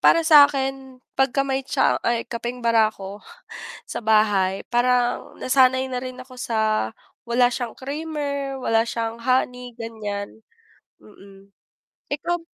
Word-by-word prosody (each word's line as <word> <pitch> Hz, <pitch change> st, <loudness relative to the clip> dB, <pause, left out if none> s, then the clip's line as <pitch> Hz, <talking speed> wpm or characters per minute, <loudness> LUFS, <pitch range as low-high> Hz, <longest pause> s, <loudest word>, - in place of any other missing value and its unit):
para 330 Hz, -1 st, +5 dB
sa'kin 270 Hz, -4 st, +4 dB, 0.2 s
pagka 270 Hz, +1 st, +2 dB
may 270 Hz, -1 st, -1 dB
tsaa -, -, +2 dB
ay 235 Hz, 0 st, +1 dB
kapeng 240 Hz, +1 st, -5 dB
barako, 215 Hz, -3 st, +1 dB, 0.7 s
sa -, -, -5 dB
bahay, 205 Hz, -3 st, +2 dB
parang 245 Hz, 0 st, +1 dB
nasanay 260 Hz, 0 st, +3 dB
na 250 Hz, -1 st, -4 dB
rin 255 Hz, 0 st, -7 dB
ako 255 Hz, 0 st, -11 dB
sa 220 Hz, -, 0 dB, 0.4 s
wala 245 Hz, +1 st, +4 dB
siyang 245 Hz, -3 st, -4 dB
creamer, 280 Hz, -1 st, -4 dB
wala 225 Hz, -3 st, +2 dB
siyang 230 Hz, 0 st, -4 dB
honey, 250 Hz, 0 st, 0 dB
ganiyan. 220 Hz, -2 st, -6 dB, 0.6 s
Mm, 195 Hz, -1 st, -17 dB, 0.6 s
ikaw 345 Hz, +4 st, -1 dB
250 Hz, 120 wpm, -23 LUFS, 220-270 Hz, 0.7 s, para